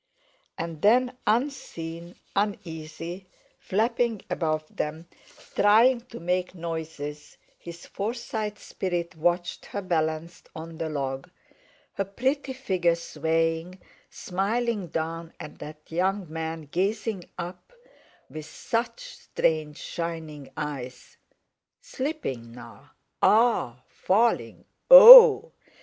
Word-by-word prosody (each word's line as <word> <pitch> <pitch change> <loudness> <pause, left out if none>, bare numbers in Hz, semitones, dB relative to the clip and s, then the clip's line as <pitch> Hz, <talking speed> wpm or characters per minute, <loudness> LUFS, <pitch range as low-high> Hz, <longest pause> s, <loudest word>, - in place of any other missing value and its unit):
And 165 -2 -6
then 250 +4 +3
unseen, 175 - -3 0.2
uneasy, 175 -2 -4 0.3
flapping 230 +1 -1
above 155 -2 -1
them, 160 +3 -4 0.5
trying 230 +5 +4
to 235 - -10
make 180 +2 -2
noises, 160 -3 -7 0.2
his 170 0 -11
Forsyte 215 -1 -4
spirit 175 -3 -4
watched 175 +2 -1
her 205 - -5
balanced 160 -2 -3
on 165 0 -9
the 165 -1 -3
log, 135 -3 -4 0.6
her 195 - -2
pretty 265 +8 -2
figure 185 -10 0
swaying, 165 +2 -2 0.3
smiling 205 +2 -2
down 165 +1 -5
at 150 - -10
that 150 0 -9
young 190 +3 0
man 160 0 -4
gazing 195 +5 -2
up 180 - -8 0.6
with 155 -1 -9
such 235 - -3 0.2
strange, 155 -2 -1
shining 160 -4 -6
eyes, 135 -4 -7 0.6
slipping 135 - -5
now—a—ah! 130 - -1
falling, 225 +5 0 0.2
o—oh! - - +11
170 Hz, 95 wpm, -26 LUFS, 160-210 Hz, 0.6 s, o—oh